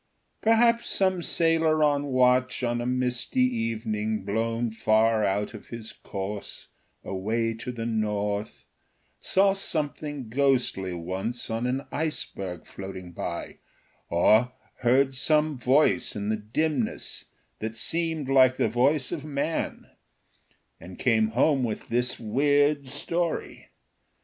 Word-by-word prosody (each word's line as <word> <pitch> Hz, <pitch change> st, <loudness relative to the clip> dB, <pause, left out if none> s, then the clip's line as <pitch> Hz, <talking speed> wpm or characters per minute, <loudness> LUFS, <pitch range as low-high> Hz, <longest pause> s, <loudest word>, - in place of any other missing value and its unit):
Perhaps 230 Hz, +1 st, +3 dB
some 185 Hz, -2 st, +1 dB
sailor 165 Hz, -2 st, +2 dB
on 145 Hz, -1 st, +2 dB
watch 130 Hz, -1 st, +2 dB
on 120 Hz, 0 st, 0 dB
a 120 Hz, -, -2 dB
misty 125 Hz, 0 st, 0 dB
evening 110 Hz, -3 st, -1 dB
blown 115 Hz, +3 st, -1 dB
far 110 Hz, 0 st, +2 dB
out 100 Hz, +3 st, 0 dB
of 110 Hz, -, -11 dB
his 115 Hz, -2 st, -8 dB
course 100 Hz, +1 st, -6 dB, 0.3 s
away 115 Hz, +4 st, -1 dB
to 115 Hz, +2 st, -6 dB
the 115 Hz, -2 st, -5 dB
north 105 Hz, -2 st, -2 dB, 0.5 s
saw 195 Hz, +1 st, +3 dB
something 150 Hz, -, -3 dB
ghostly 125 Hz, -7 st, +1 dB
once 95 Hz, +8 st, -4 dB
on 115 Hz, +2 st, -1 dB
an 130 Hz, +2 st, -2 dB
iceberg 100 Hz, -, -4 dB
floating 95 Hz, -2 st, -8 dB
by, 85 Hz, 0 st, -5 dB, 0.5 s
or 110 Hz, +8 st, +4 dB, 0.2 s
heard 130 Hz, +2 st, +3 dB
some 150 Hz, +3 st, +2 dB
voice 130 Hz, +4 st, +2 dB
in 105 Hz, 0 st, -3 dB
the 110 Hz, -, +2 dB
dimness 120 Hz, +4 st, -2 dB, 0.3 s
that 110 Hz, +1 st, -4 dB
seemed 160 Hz, +3 st, -1 dB
like 130 Hz, -1 st, +5 dB
the -, -, +2 dB
voice 130 Hz, +5 st, +2 dB
of 160 Hz, -5 st, -4 dB
man, 150 Hz, +2 st, -2 dB, 0.9 s
and 90 Hz, +2 st, -11 dB
came 110 Hz, -3 st, +3 dB
home 130 Hz, +4 st, +2 dB
with 110 Hz, -3 st, -4 dB
this 125 Hz, +1 st, 0 dB
weird 145 Hz, +4 st, +2 dB
story. 165 Hz, +5 st, -2 dB
125 Hz, 120 wpm, -26 LUFS, 110-145 Hz, 0.9 s, like